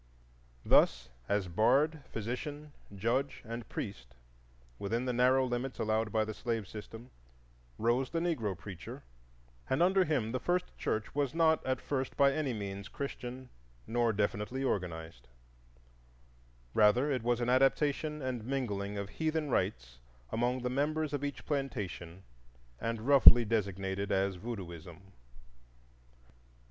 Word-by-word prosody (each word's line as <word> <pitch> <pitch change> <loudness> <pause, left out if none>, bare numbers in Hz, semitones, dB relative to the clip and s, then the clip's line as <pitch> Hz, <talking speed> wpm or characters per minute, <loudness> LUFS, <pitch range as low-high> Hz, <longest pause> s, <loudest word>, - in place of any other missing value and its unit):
Thus, 65 -1 +4 0.2
as 100 -2 +1
bard, 135 - +2
physician, 145 +7 -5 0.2
judge, 125 +7 -1
and 115 -1 -6
priest, - - -6 0.6
within 115 +5 -1
the 125 - 0
narrow 130 +2 +4
limits 125 +1 -3
allowed 110 0 0
by 110 -1 +2
the 110 - -4
slave 115 -3 -3
system, 115 +4 -9 0.7
rose 120 +3 +1
the 165 - -1
Negro 120 - -1
preacher, 90 -2 -9 0.7
and 130 +6 +3
under 190 +1 +4
him 140 -10 0
the 130 - -1
first 180 +5 -1
church 110 0 -2
was 145 0 -1
not 160 -1 +3
at 130 -1 +1
first 135 -2 -3
by 140 -1 +5
any 150 -3 -1
means 100 -2 -5
Christian 130 -2 -6 0.4
nor 120 0 +1
definitely 105 +5 -1
organized; 80 - -3 1.5
rather 115 +7 +4
it 130 -3 0
was 120 +1 +1
an 120 0 0
adaptation 145 +3 +2
and 125 -3 -3
mingling 105 -6 -2
of 100 0 -3
heathen 155 +2 -1
rites 65 - -1 0.3
among 125 +2 0
the 125 - 0
members 150 +2 0
of 145 -1 -2
each 145 0 -4
plantation, 100 - -4 0.6
and 115 -1 -2
roughly 130 -4 +9
designated 100 -2 -1
as 95 0 +1
Voodooism. 90 -4 -8
120 Hz, 130 wpm, -32 LUFS, 100-135 Hz, 1.5 s, roughly